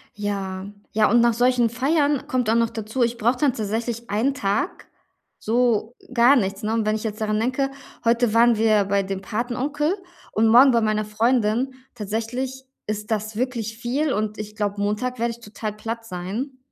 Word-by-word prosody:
Ja. 195 -2 -3 0.3
Ja, 215 -1 +3
und 240 +2 +5
nach 235 -1 +4
solchen 245 0 +3
Feiern, 285 +3 +1
kommt 250 -3 0
auch - - +3
noch 230 -1 +2
dazu, 225 +2 -3
ich 235 0 +1
brauche 240 +3 +2
dann 280 -1 +3
tatsächlich 230 +2 -3
einen 230 +7 +1
Tag 205 - -2 0.5
so 230 0 +1 0.2
gar 245 +3 +6
nichts, 195 -2 -1
ne, 215 - 0
und 225 - +1
wenn 215 0 +2
ich 220 - -6
jetzt 215 -1 -4
daran 215 -1 0
denke: 260 +4 0 0.3
„Heute 235 -1 +2
waren 235 0 +5
wir 215 -2 +3
bei 200 0 +2
dem 195 0 -4
Patenonkel 255 - -1 0.4
und 220 +1 +3
morgen 250 +4 +7
bei 235 - +3
meiner 215 -1 +1
Freundin.” 230 +3 +1 0.2
Tatsächlich, 240 +5 -4 0.2
ist 210 0 -4
das 215 0 -2
wirklich 230 -3 -2
viel, 270 +5 0
und 215 0 -2
ich 210 0 -7
glaube, 205 -1 -2
Montag 215 +5 -1
werde 235 +1 0
ich 235 - -12
total 215 -1 -5
platt 230 +2 -5
sein. 210 +9 -5
230 Hz, 185 wpm, -23 LUFS, 210-245 Hz, 0.5 s, morgen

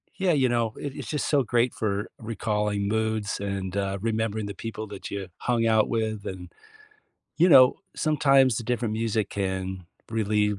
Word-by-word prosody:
Yeah, 190 -2 +1
you 130 -4 +3
know, 115 -2 0
it 140 -2 -5
it's - - -7
just 150 - -2
so 140 -3 +3
great 120 +1 +1
for 105 -1 -2
recalling 105 -2 -1
moods 110 -1 -1
and, 100 -2 -3
uh, 100 0 -1
remembering 110 -1 -1
the 100 - -5
people 110 +2 -6
that 100 -1 -8
you 100 -2 -4
hung 120 -2 0
out 110 -1 +4
with, 110 -2 -2
and, 90 -2 -7 0.9
you 175 +3 +5
know, 130 -6 +7 0.2
sometimes 135 -6 +3
the 120 - -3
different 120 -1 -1
music 110 -1 -1
can 95 -2 -3 0.2
relieve 105 -2 +1
110 Hz, 170 wpm, -26 LUFS, 100-120 Hz, 0.9 s, know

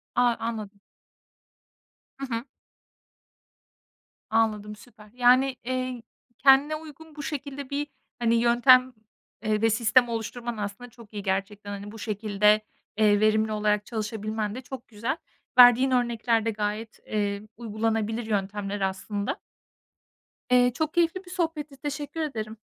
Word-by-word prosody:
A, 245 - +4 0.2
anladım. 215 -3 -5 1.4
Hı 275 - -4
hı. 230 - -3 1.9
Anladım, 215 -2 0
süper. 210 -1 -17
Yani, 255 +2 +4
eee, 255 0 -3 0.4
kendine 275 +3 +5
uygun 315 0 -11
bu 295 - -6
şekilde 280 -2 -5
bir, 290 +1 -2 0.3
hani, 235 -1 +2
yöntem, 250 +2 +5 0.5
eee, 215 0 0
ve 225 - +4
sistem 240 +2 +4
oluşturman 235 +1 -4
aslında 205 +4 -5
çok 230 -2 -16
iyi 205 -2 -5
gerçekten. 200 +1 -2
Hani, 200 +1 -7
bu 225 - -10
şekilde, 210 0 +2 0.4
eee, 205 -1 +4
verimli 215 0 +3
olarak 210 -1 +1
çalışabilmen 215 -1 -3
de 260 - -6
çok 260 -1 -9
güzel. 230 +7 -3 0.4
Verdiğin 245 +2 +8
örnekler 235 -2 +1
de 225 - +1
gayet, 210 +1 -4
eee, 205 -1 -1
uygulanabilir 225 0 -1
yöntemler 205 -1 -2
aslında. 195 +2 -2 1.1
Eee, 245 0 +5
çok 315 +2 -2
keyifli 345 +2 +1
bir - - -13
sohbetti, 310 -5 -3
teşekkür 290 +2 -5
ederim. 220 -7 -4
225 Hz, 125 wpm, -26 LUFS, 210-255 Hz, 1.9 s, Verdiğin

